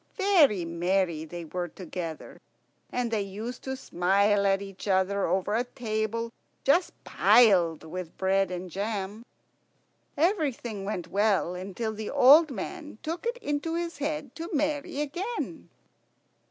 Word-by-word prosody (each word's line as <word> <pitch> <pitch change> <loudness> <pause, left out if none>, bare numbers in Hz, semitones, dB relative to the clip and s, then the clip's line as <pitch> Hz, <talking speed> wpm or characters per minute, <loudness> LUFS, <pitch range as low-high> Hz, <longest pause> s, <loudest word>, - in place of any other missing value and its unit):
Very 315 - +4
merry 170 -1 0
they 170 +1 -7
were 175 +2 -3
together, 170 -2 -7 0.5
and 245 -2 -1
they 220 -2 +1
used 215 +6 -6
to 265 0 -2
smile 200 0 +2
at 195 0 +3
each 195 0 -9
other 195 +1 +2
over 190 +4 0
a 235 +3 +2
table 230 -1 -3 0.3
just 335 +7 +3
piled 180 -10 +4
with 170 +1 -7
bread 195 0 +2
and 180 0 -5
jam. 205 +2 -3 0.9
Everything 280 - 0
went 190 -4 -4
well, 200 -3 +2
until 195 +5 -4
the 215 0 -5
old 285 +4 +7
man 300 - -6
took 335 +8 -3
it 480 +1 -1
into 295 +3 -1
his 340 -3 -3
head 290 -2 -3
to 335 +1 -5
marry 295 -2 -1
again. 360 +11 -4
215 Hz, 135 wpm, -28 LUFS, 190-285 Hz, 0.9 s, old